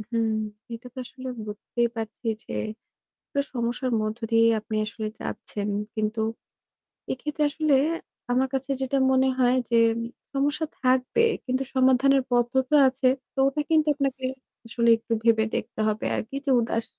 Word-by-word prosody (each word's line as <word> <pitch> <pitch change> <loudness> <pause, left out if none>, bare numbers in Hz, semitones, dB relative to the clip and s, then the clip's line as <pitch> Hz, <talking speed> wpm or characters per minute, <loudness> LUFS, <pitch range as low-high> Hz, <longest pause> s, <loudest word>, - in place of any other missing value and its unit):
উম 215 - -7
হুম। 230 -1 +1 0.5
এটা 235 +2 -10
তো 260 - -9
আসলে 260 +1 -9 0.2
বুঝতেই 225 +3 -1
পারছি 225 +2 -6 0.2
যে, - - -9 0.8
একটা 280 - 0
সমস্যার 245 +1 -1
মধ্য 215 +1 -2
দিয়েই 230 0 +5
আপনি 215 +1 -5
আসলে 220 0 -5
যাচ্ছেন। 205 0 -4 0.3
কিন্তু, 215 0 -1 0.9
এক্ষেত্রে 300 +3 -2
আসলে 300 -1 +2 0.6
আমার 255 +2 +2
কাছে 270 0 -2
যেটা 265 +1 0
মনে 260 0 +4
হয় 250 0 +4
যে 235 - +2 0.6
সমস্যা 285 +3 +1 0.2
থাকবে 255 - +2 0.2
কিন্তু 255 +1 0
সমাধানের 265 +1 +4
পদ্ধতি 245 +3 +1
আছে। 260 0 +1 0.3
তো - - -56
ওটা 275 +2 0
কিন্তু 315 -1 +3
আপনাকে 270 -2 -2 0.4
আসলে 235 0 +1
একটু 230 0 -4
ভেবে 225 -1 +4
দেখতে - - -4
হবে 215 0 -1
আরকি 225 +5 -4
যে 275 - +2
উদাস 230 -1 -1
255 Hz, 150 wpm, -26 LUFS, 230-270 Hz, 0.9 s, দিয়েই